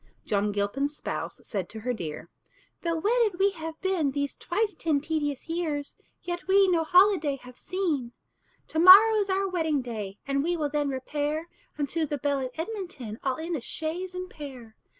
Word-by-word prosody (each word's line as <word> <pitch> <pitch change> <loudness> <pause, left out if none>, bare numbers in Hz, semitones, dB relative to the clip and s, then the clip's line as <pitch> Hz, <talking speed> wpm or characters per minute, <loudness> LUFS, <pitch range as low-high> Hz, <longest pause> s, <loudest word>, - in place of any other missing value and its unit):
John 205 0 +1
Gilpin's 270 +9 -1
spouse - - -4
said 195 -5 -4
to 220 0 -8
her 250 +2 -1
dear, 165 -5 -6 0.5
"Though 335 -1 0
wedded 430 +1 +2
we 395 +1 +3
have 325 -3 -7
been 375 -7 +1
These 285 +1 -2
twice 415 +4 -1
ten 320 -3 +1
tedious 295 -2 -2
years, 320 -4 -2 0.3
yet 350 0 -4
we 390 0 +5
No 340 -3 +3
holiday 360 -4 +4
have 250 -2 -13
seen. 320 -11 -2 0.6
"To 320 - -1
morrow 390 +6 +10
is 405 -2 0
our 390 +1 +1
wedding 320 -7 0
day, 210 -5 -5
And 275 0 0
we 345 +2 0
will 300 -2 -1
then 290 -1 0
repair 295 +4 -2 0.3
Unto 305 +2 -1
the 290 - -2
Bell 280 +1 0
at 255 +1 -5
Edmonton 330 - -5
All 265 -2 +1
in 330 +3 -3
a 285 - -3
chaise 345 +8 -4
and 365 0 -4
pair. 260 -9 -10
310 Hz, 180 wpm, -27 LUFS, 270-360 Hz, 0.6 s, morrow